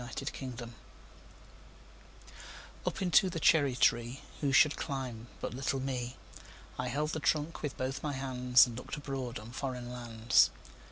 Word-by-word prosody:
Foreign 130 0 -5
Lands 120 -1 -7 2.1
UP - - -2
into 180 +1 +5
the 170 -2 -4
cherry 145 -5 +4
treeWho 125 +4 0
should 150 +1 +6
climb 125 -4 -4
but - - -4
little 135 +1 -1
me?I 130 -2 -6
held 150 +2 -1
the 160 - -2
trunk 155 +2 0
with 145 -3 -4
both 135 +1 -3
my 145 -2 -2
handsAnd 125 -2 +3
looked 125 - -6
abroad 135 -4 -4
on 110 +2 -9
foreign 125 -2 -4
lands. 120 -1 +3
130 Hz, 130 wpm, -32 LUFS, 120-145 Hz, 2.1 s, should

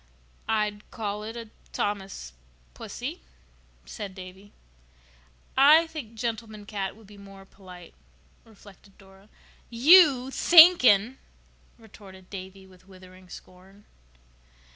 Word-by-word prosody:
"I'd 210 -1 -3
call 210 -2 -6
it 225 +2 -8
a 230 -2 -10 0.2
Thomas 195 - -5 0.4
pussy," - - -8 0.6
said 190 - -9
Davy. 190 +2 -13 1.0
"I 300 +5 +5
think 300 -9 -10
'gentleman 225 -2 -6
cat' 200 -2 -6
would 220 0 -19
be 205 0 -17
more 195 -1 -15
polite," 180 -3 -16 0.5
reflected 200 -2 -20
Dora. 195 +1 -21 0.4
"You 270 0 +5
thinking!" 265 - +5 0.6
retorted 195 -4 -17
Davy 190 0 -10
with 185 0 -22
withering 185 -1 -17
scorn. 190 +4 -16
205 Hz, 100 wpm, -25 LUFS, 190-230 Hz, 1.0 s, I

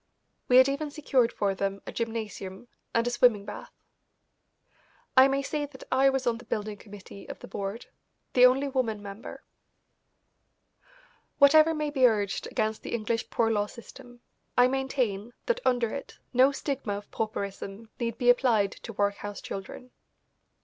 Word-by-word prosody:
We 250 - +6
had 260 +1 +8
even 285 +2 -2
secured 275 -5 +1
for 200 -1 0
them 195 +1 -2
a - - -6
gymnasium 220 -2 -5 0.2
and 230 0 +1
a 245 - 0
swimming 230 -5 +3
bath. - - -8 1.4
I 260 0 +8
may 275 0 0
say 290 +1 -2
that 265 -2 -13
I 270 +1 +5
was 270 -1 -1
on 235 -1 0
the 245 - -13
building 210 -1 -3
committee 200 -1 -12
of - - -6
the - - -11
board, 200 +3 -5 0.5
the 250 0 +8
only 270 +3 +1
woman 235 -6 -1
member. 200 +2 -9 1.9
Whatever 310 +3 +6
may 300 -1 -2
be 265 -3 +5
urged 205 -4 -1
against 215 0 -1
the - - -3
English 230 +1 -2
Poor 225 -1 +1
Law 205 -1 +1
system, 245 +2 -13 0.4
I 245 0 +7
maintain 255 -5 -1
that 485 0 +1
under 245 -3 +1
it 275 - -7 0.2
no 260 +3 +5
stigma 275 -6 -3
of 205 - -11
pauperism 200 0 -5
need 230 -2 -2
be 245 -1 +6
applied 225 -6 +2
to 230 - -9
workhouse 205 0 -2
children. 195 +6 -8
235 Hz, 155 wpm, -28 LUFS, 205-265 Hz, 1.9 s, had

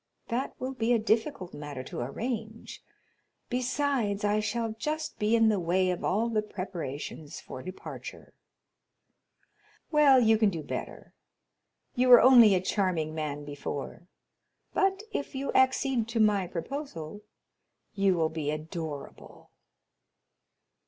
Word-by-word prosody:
—that 245 +4 -2
will 260 +1 -3
be 235 -2 0
a - - +4
difficult 220 -2 -1
matter 145 -3 -7
to - - -7
arrange, 220 - -5 0.7
besides, 250 -4 0
I 210 +1 +2
shall 225 +1 -2
just 310 +4 -3
be 215 +2 +2
in 225 -1 +5
the 210 -3 +1
way 180 +2 +1
of 180 - -4
all 215 +5 +1
the 220 -2 +1
preparations 170 -7 -6
for 130 - -9
departure." 185 +4 -9 1.6
"Well, 290 -4 +6
you 220 -2 +4
can 215 -2 +4
do 165 -5 -5
better. - - -7 0.8
You 250 +1 +2
were 245 -1 +11
only 240 -6 +8
a 180 - +1
charming 180 -5 -1
man 150 -2 -4
before, 145 +3 -6 0.7
but, 390 +1 +1
if 285 - -4
you 275 +1 -2
accede 260 -2 +2
to 230 0 -2
my 205 -4 +3
proposal, 185 - -6 0.7
you 195 -2 +2
will 160 -2 +1
be 155 -2 -3
adorable." 155 -1 -7
210 Hz, 130 wpm, -29 LUFS, 165-245 Hz, 1.6 s, were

